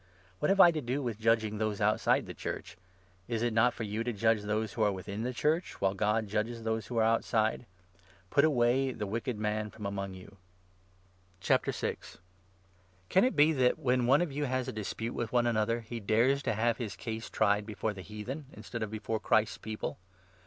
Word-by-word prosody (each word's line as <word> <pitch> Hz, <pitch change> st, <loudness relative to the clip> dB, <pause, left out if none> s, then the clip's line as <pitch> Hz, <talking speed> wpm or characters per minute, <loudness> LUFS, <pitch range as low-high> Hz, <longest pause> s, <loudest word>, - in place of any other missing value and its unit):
What -, -, +1 dB
have 195 Hz, 0 st, +3 dB
I 175 Hz, -, +9 dB
to 155 Hz, -2 st, -3 dB
do 120 Hz, -1 st, -3 dB
12 140 Hz, -2 st, -2 dB
with 115 Hz, -3 st, -3 dB
judging 110 Hz, -2 st, +1 dB
those 110 Hz, -2 st, -1 dB
outside 105 Hz, +1 st, +2 dB
the -, -, -7 dB
Church? -, -, -6 dB, 0.5 s
Is 115 Hz, -1 st, -1 dB
it 120 Hz, -1 st, +1 dB
not 115 Hz, +2 st, +4 dB
for 115 Hz, -, -6 dB
you 105 Hz, +2 st, -2 dB
to 120 Hz, -, -1 dB
judge 110 Hz, 0 st, +2 dB
those 105 Hz, +1 st, -2 dB
who 115 Hz, -, -3 dB
are 105 Hz, -1 st, +4 dB
within 100 Hz, +2 st, -5 dB
the 125 Hz, +2 st, -1 dB
Church, 155 Hz, +7 st, -1 dB
while 95 Hz, -1 st, +2 dB
God 105 Hz, +2 st, +1 dB
13 -, -, -9 dB
judges 115 Hz, +2 st, -2 dB
those 110 Hz, 0 st, -2 dB
who 120 Hz, -, -4 dB
are 110 Hz, -, +4 dB
outside? 115 Hz, 0 st, +1 dB, 0.3 s
' 90 Hz, +1 st, -29 dB
Put 140 Hz, -, +4 dB
away 130 Hz, -2 st, +3 dB
the 110 Hz, -, -4 dB
wicked 115 Hz, +3 st, -3 dB
man 105 Hz, 0 st, -1 dB
from 105 Hz, -1 st, -9 dB
among 100 Hz, -1 st, -4 dB
you.' 95 Hz, +2 st, -13 dB, 1.1 s
Lawsuit* -, -, -1 dB, 0.9 s
Can 190 Hz, -, +4 dB
it 255 Hz, -, +2 dB
be 150 Hz, +2 st, +5 dB
that, 130 Hz, -3 st, +3 dB
when 125 Hz, -1 st, +1 dB
one 140 Hz, +6 st, +5 dB
of 170 Hz, -, -4 dB
you 145 Hz, +2 st, -2 dB
has 130 Hz, -1 st, -1 dB
a -, -, -2 dB
dispute 110 Hz, +1 st, -4 dB
i -, -, -2 dB
b«twe«n -, -, +1 dB
with 120 Hz, -1 st, +3 dB
another, 115 Hz, 0 st, +1 dB
he 115 Hz, +1 st, -6 dB
dares 115 Hz, +6 st, +2 dB
to 125 Hz, -, 0 dB
have 115 Hz, +1 st, +1 dB
his 110 Hz, -7 st, -4 dB
case 110 Hz, +3 st, -5 dB
tried 105 Hz, 0 st, +3 dB
Christians, -, -, -18 dB
before 105 Hz, 0 st, -2 dB
the 95 Hz, -, -8 dB
heathen, 115 Hz, +9 st, -7 dB
instead 115 Hz, +2 st, -7 dB
of 110 Hz, -, -2 dB
before 110 Hz, +1 st, -3 dB
Christ's 105 Hz, -4 st, +1 dB
People 110 Hz, -3 st, -5 dB
110 Hz, 215 wpm, -31 LUFS, 105-125 Hz, 1.1 s, I